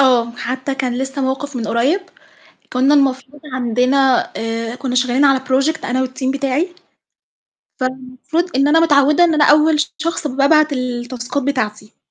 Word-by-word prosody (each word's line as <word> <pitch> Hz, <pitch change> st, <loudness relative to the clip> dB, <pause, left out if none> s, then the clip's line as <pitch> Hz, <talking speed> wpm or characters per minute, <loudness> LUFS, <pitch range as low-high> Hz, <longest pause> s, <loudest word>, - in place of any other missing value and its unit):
آه، 245 Hz, -3 st, +3 dB
حتّى 260 Hz, +3 st, -4 dB
كان 255 Hz, -2 st, -2 dB
لسّه 270 Hz, +1 st, -3 dB
موقِف 270 Hz, +1 st, -3 dB
من 230 Hz, -2 st, -3 dB
قريّب، 265 Hz, +12 st, +1 dB, 0.7 s
كُنّا 265 Hz, +3 st, +3 dB
المفروض 275 Hz, 0 st, 0 dB
عندنا 255 Hz, +2 st, +1 dB
آآ، 225 Hz, +1 st, -4 dB
كُنّا 255 Hz, 0 st, -4 dB
شغّالين 255 Hz, +2 st, +2 dB
على 270 Hz, -2 st, +4 dB
project 270 Hz, +4 st, 0 dB
أنا 260 Hz, +2 st, 0 dB
والteam 260 Hz, +1 st, -3 dB
بتاعي، 280 Hz, +6 st, -1 dB, 1.1 s
فالمفروض 260 Hz, +6 st, -3 dB
إن 275 Hz, +2 st, +3 dB
أنا 325 Hz, +2 st, +4 dB
متعوِّدة 300 Hz, +1 st, +4 dB
إن 335 Hz, -2 st, +2 dB
أنا 300 Hz, -1 st, +3 dB
أول 300 Hz, +1 st, +4 dB, 0.2 s
شخص 325 Hz, 0 st, -3 dB
بابعت 290 Hz, +3 st, +3 dB
التاسكات 250 Hz, +1 st, -4 dB
بتاعتي. 215 Hz, -6 st, -3 dB
265 Hz, 145 wpm, -17 LUFS, 255-290 Hz, 1.1 s, على